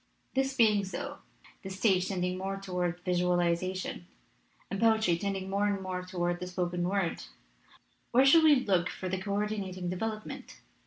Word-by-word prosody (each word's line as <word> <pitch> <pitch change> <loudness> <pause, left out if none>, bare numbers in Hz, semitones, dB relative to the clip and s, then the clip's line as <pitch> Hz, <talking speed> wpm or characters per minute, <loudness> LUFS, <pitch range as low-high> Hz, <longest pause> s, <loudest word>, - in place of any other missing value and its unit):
"This 270 0 0
being 215 -3 +4
so, 280 +9 -5 0.4
the 190 - -7
stage 190 -1 +2
tending 180 -1 -1
more 195 +1 -3
tow 185 -2 -5
ard 175 0 -1
visualization, 180 0 0 0.6
and 195 - -2
poetry 220 -5 +4
tending 195 +1 -3
more 200 +2 +1
and 200 -1 0
more 185 -1 -4
toward 175 -1 -2
the 180 - -5
spoken 180 -1 -1
word, 195 -3 -1 0.9
where 260 +3 +5
shall 320 +4 +7
we 305 -2 +7
look 180 -3 +2
for 185 - -5
the 185 +1 -2
co 200 +1 -3
ordinating 195 -4 -2
development? 215 +3 -5
190 Hz, 160 wpm, -30 LUFS, 180-205 Hz, 0.9 s, shall